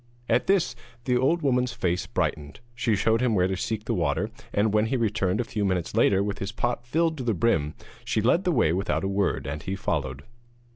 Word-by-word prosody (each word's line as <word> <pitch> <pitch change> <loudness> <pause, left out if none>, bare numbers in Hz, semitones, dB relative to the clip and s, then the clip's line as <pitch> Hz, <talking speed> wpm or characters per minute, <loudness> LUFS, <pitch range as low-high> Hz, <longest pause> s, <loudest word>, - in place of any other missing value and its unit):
At - - +2
this 175 -11 +2 0.3
the 125 - +2
old 140 +7 +2
woman's 125 -2 +1
face 90 -6 -1
brightened. 75 -1 -2
She 115 -2 +1
showed 115 +3 +2
him 125 -4 +2
where 90 -1 +3
to 95 - -1
seek 105 +3 -3
the - - -1
water, 85 +6 0 0.2
and 105 +1 +1
when 105 +1 +3
he 130 - 0
returned 105 -4 0
a - - +2
few 105 -2 -3
minutes 90 -4 -1
later 100 0 +4
with 100 0 -3
his 100 +1 -3
pot 120 0 -2
filled 160 +3 +1
to - - -3
the 115 -3 0
brim, 80 -7 +1 0.3
she - - 0
led 125 - +3
the 180 - +1
way 115 - +3
without 95 +2 -1
a - - 0
word, 100 -1 0
and 75 +2 -4
he 95 - -3
followed. 70 -7 -2
105 Hz, 225 wpm, -26 LUFS, 90-120 Hz, 0.3 s, later